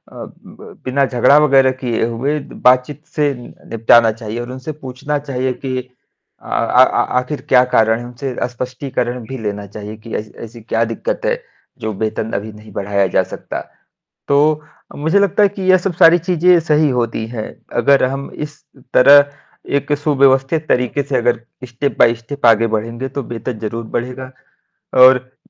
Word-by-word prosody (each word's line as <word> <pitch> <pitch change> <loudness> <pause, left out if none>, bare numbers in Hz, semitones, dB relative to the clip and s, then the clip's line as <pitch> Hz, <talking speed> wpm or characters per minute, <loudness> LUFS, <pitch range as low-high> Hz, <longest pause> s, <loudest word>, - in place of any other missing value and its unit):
ब - - -12
बिना 135 +2 +1
झगड़ा 130 +3 +4
वगैरह 135 -3 +4
किए 120 -3 0
हुए 135 +6 -2
बातचीत 130 +3 +1
से 145 -2 +1
नि 120 -1 -12 0.2
निपटाना 115 0 +4
चाहिए। 110 +1 -6
और 120 - -6
उनसे 130 +4 -6
पूछना 145 0 -5
चाहिए 130 -2 -2
कि 130 +1 -5 0.6
अ, - - -21
आ 125 +2 +3
आ - - +1 0.2
आखिर 130 +2 -5
क्या 125 -1 +6
कारण 110 0 +3
है 120 - -8
उनसे 125 +1 -6
स्पष्टीकरण 125 0 -4
भी 130 - -6
लेना 105 -1 -4
चाहिए 105 +1 -8
कि, 110 +1 -11
ऐसी 105 0 -5
ऐसी 115 +1 -11
क्या 115 +1 0
दिक्कत - - -4
है, - - +2 0.4
जो 110 -2 -3
वेतन 110 +2 -3
अभी 105 +2 -3
नहीं 105 +1 -14
बढ़ाया 100 -1 0
जा - - +4
सकता। - - -7 0.7
तो, 150 +2 +3 0.3
मुझे 160 +7 +1
लगता 200 +1 +2
है 205 - +6
कि 195 0 -8
ये 185 - +6
सब 185 +1 -2
सारी 165 +1 +6
चीज़ें 180 0 +3
सही 155 -1 +2
होती 115 -2 -2
है, 115 -2 -5 0.3
अगर 140 -1 +4
हम 135 +2 -3
इस 150 -1 -8 0.3
तरह 145 +2 +7 0.5
एक 140 +1 -2
सुव्यवस्थित 140 +1 +2
तरीके 125 +3 +1
से 140 -1 -2
अगर 120 -1 +1 0.3
स्टेप 130 +4 -3
बाय 115 -1 +5
स्टेप 120 +4 -4
आगे 115 0 +5
बढ़ेंगे 115 +4 -5
तो 140 +1 -5
वेतन 120 0 -6
ज़रूर 115 +2 -5
बढ़ेगा। 125 +2 -5 0.7
और 130 0 +4
130 Hz, 170 wpm, -17 LUFS, 115-145 Hz, 0.7 s, तरह